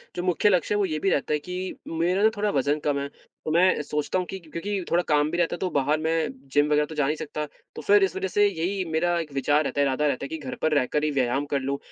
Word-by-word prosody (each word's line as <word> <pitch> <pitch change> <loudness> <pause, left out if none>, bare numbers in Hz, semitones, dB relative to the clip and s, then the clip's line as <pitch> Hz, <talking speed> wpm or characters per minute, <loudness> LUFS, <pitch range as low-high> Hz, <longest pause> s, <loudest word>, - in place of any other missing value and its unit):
जो 175 - -3
मुख्य 185 +3 +3
लक्ष्य 185 +2 +2
है, - - +2
वो 200 - +2
ये 155 -4 -2
भी 195 - +1
रहता 145 -1 0
है 150 - +1
कि 180 +4 -5
मेरा 175 +4 0
ना 220 - +7
थोड़ा 210 0 +1
वज़न 145 +3 +1
कम 145 -1 +1
है। 140 - -3 0.4
तो - - -1
मैं 180 +1 +4
सोचता 150 +4 -1
हूँ 180 - -2
कि 190 - -5
क्योंकि 185 +4 -4
थोड़ा 175 +1 +3
काम 150 0 +2
भी 175 - -2
रहता 170 0 +1
है, - - -9
तो 185 - -1
बाहर 150 +3 +1
मैं 160 0 0 0.2
जिम 145 0 +4
वग़ैरह 150 0 +3
तो 155 - -9
जा 145 -2 +1
नहीं 150 - 0
सकता। 150 0 -4 0.3
तो - - -6
फिर 205 0 +5
इस 185 -2 0
वज़ह 190 0 -1
से 205 - +6
यही 190 +1 -2
मेरा 175 +2 +1
एक 155 -4 -6
विचार 145 +3 +2
रहता 145 - -3
है, - - +4
इरादा 145 +3 +1
रहता 140 -1 -1
है - - -5
कि 160 - -4
घर 135 -4 -6
पर 155 -1 +2
रहकर 150 +4 -1
ही 155 - +1
व्यायाम 135 0 0
कर - - +2
लूँ, 135 +1 -2
160 Hz, 290 wpm, -25 LUFS, 145-180 Hz, 0.4 s, ना